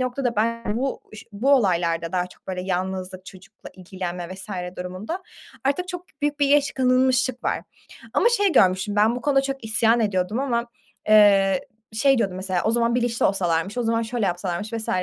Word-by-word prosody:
noktada 255 -2 -1
ben 230 0 -1
bu 270 +1 -2
ş 210 - -11
bu 235 +7 0
olaylarda 170 -7 +1
daha 180 -1 0
çok 180 - -20
böyle 185 -1 -4
yalnızlık, 185 0 -4
çocukla 195 +2 -13
ilgilenme 180 -2 -6
vs. 190 +2 -11 0.3
durumunda 185 - -5 0.4
artık 320 +7 0
çok 355 -1 -6 0.2
büyük 295 0 -1
bir 285 - +3
geç 285 0 +3
kalınmışlık 255 0 +2
var. - - 0 0.5
Ama 470 - +4
şey 410 -6 +2
görmüştüm, 190 +2 +3
ben 220 +3 +3
bu 250 - -5
konuda 280 -2 +3
çok 270 -3 -4
isyan 225 +1 +2
ediyordum 205 +1 0
ama, 240 -3 -1 0.4
eee, 200 -3 +5 0.2
şey, 270 +4 +3
diyordum 190 -5 -1
mesela, 185 -1 -2
"O 220 - +2
zaman 235 0 +1
bilinçli 240 -1 +1
olsalarmış, 185 +2 0
o - - +1
zaman 230 0 +1
şöyle 225 -2 -2
yapsalarmış 180 +3 -3
vs." 225 -1 -4
220 Hz, 175 wpm, -23 LUFS, 185-255 Hz, 0.5 s, eee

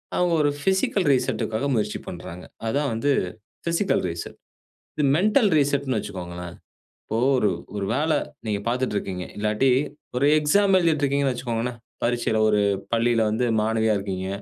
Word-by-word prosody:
அவங்க 180 -1 +2
ஒரு 145 - +3
பிசிக்கல் 190 0 +1
ரீசெட்க்காக 125 0 -1
முயற்சி 105 -2 -1
பண்ணுறாங்க. 90 0 -8 0.2
அதுதான் 140 +4 0
வந்து 140 +6 0 0.6
பிசிக்கல் 170 +4 +1
ரீசெட். 85 0 -6 0.6
இது 150 - 0
மெண்டல் 210 +3 +3
ரீசெட்ன்னு 140 -3 +1
வச்சுக்கோங்களேன், 90 -2 -7 0.5
இப்போ 110 - -3 0.2
ஒரு 105 -4 +2 0.3
ஒரு 100 -1 -2
வேலை 155 +1 +2 0.3
நீங்க 105 -2 0
பார்த்துட்டு 125 -3 -1
இருக்கீங்க, 90 -2 -4
இல்லாட்டி 110 +5 +2 0.5
ஒரு 140 - +2
எக்ஸாம் 195 +6 +3
எழுதிட்டு 160 -4 +1
இருக்கீங்கன்னு 140 -1 +1
வச்சுக்கோங்களேன், 120 -1 -3 0.3
பரீட்சையில 120 -2 0
ஒரு 105 -1 +3 0.3
பள்ளியில 115 -1 +2
வந்து 120 +3 0
மாணவியா 110 0 +1
இருக்கீங்க. 95 -1 -4
120 Hz, 135 wpm, -24 LUFS, 105-145 Hz, 0.6 s, ஒரு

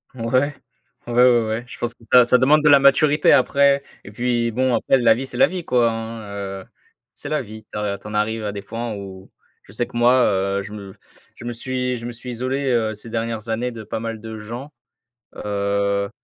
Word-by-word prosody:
Ouais. 130 +5 0 0.5
Ouais, 120 - -4
ouais, 120 -2 +5
ouais, 110 +2 -2
je - - -11
pense 120 -1 -2
que 120 - -24
ça, 125 -1 +8
ça 125 - +5
demande 145 +5 +4
de - - +4
la 140 -1 +8
maturité 145 +2 +4
après 140 +1 +4 0.2
et 100 - -11
puis 120 +1 0
bon, 130 +1 +1
après 135 - +2
la 120 -3 +5
vie, 125 +4 -4
c'est 125 - -7
la - - +6
vie, 180 -1 -5
quoi, 120 -5 +2
hein, 115 -2 -6 0.3
heu, - - -22 0.5
c'est - - -6
la - - 0
vie 110 +1 -11
tu - - -6
as 100 -1 -2
tu - - -12
en 105 - -7
arrives 110 +1 -1
à 105 - -2
des 100 0 -6
points 115 +3 -5
où 95 -2 -9 0.3
je - - -17
sais 120 +4 -2
que, - - -15
moi, 120 +1 +5
heu, 100 0 0
je 100 - -9
me 100 -2 -9 0.4
je - - -11
me 120 - -3
suis 125 +1 -2
je 115 - -8
me 120 - -4
suis 120 +2 -8
isolé, 130 +3 -2
heu, 110 -3 +1
ces 105 +2 -9
dernières 115 -1 -3
années 120 +3 -1
de 115 -2 -8
pas 110 - -5
mal 115 -1 -4
de 110 0 -8
gens, 120 +7 -8 0.6
heu 100 -1 -1
115 Hz, 230 wpm, -21 LUFS, 105-125 Hz, 0.6 s, ça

